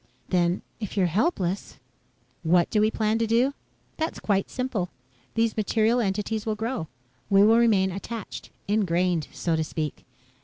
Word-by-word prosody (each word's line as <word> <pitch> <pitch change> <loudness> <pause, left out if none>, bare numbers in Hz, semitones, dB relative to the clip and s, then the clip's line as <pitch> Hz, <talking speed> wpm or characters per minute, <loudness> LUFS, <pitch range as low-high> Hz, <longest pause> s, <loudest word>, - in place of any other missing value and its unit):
"Then, 175 0 +1 0.2
if 210 -2 -5
you're 190 - +4
helpless 200 - 0 0.3
..." - - -40 0.3
"What 170 +1 +3
do 210 - +3
we 215 - +4
plan 220 0 0
to 230 - +1
do? 240 +5 +3 0.4
That's 320 +1 -2
quite 195 -2 0
simple. 245 -8 -2 0.5
These 225 -1 +2
material 220 +2 +2
entities 210 +1 -1
will 220 -1 -1
grow. 225 -5 -3 0.4
We 195 -1 +6
will 225 +2 +6
remain 200 -5 +4
attached 205 +3 -6 0.2
ingrained, 180 -5 +1
so 170 -2 -1
to 160 - +1
speak. 155 -1 -4
210 Hz, 155 wpm, -26 LUFS, 180-225 Hz, 0.5 s, We